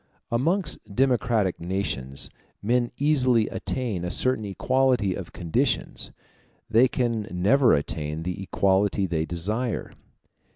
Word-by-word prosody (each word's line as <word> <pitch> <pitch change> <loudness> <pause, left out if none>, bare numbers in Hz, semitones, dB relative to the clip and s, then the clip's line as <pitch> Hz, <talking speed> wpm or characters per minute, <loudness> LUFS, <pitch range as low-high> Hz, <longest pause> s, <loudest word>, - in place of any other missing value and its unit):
Amongst 165 +10 +1 0.2
democratic 120 -6 +1
nations 85 -7 -2 0.3
men 120 +2 +1
easily 130 -6 +3
attain 115 -9 -3
a 90 - -2
certain 130 +3 +2
equality 125 0 +1
of 90 -2 -7
conditions: 85 -2 -1 0.6
they 115 +4 +5
can 115 -4 -1
never 110 +9 +4
attain 75 +2 -3
the 90 +2 -4
equality 95 +1 +1
they 80 -3 -1
desire. 105 +8 -2
105 Hz, 110 wpm, -25 LUFS, 90-125 Hz, 0.6 s, they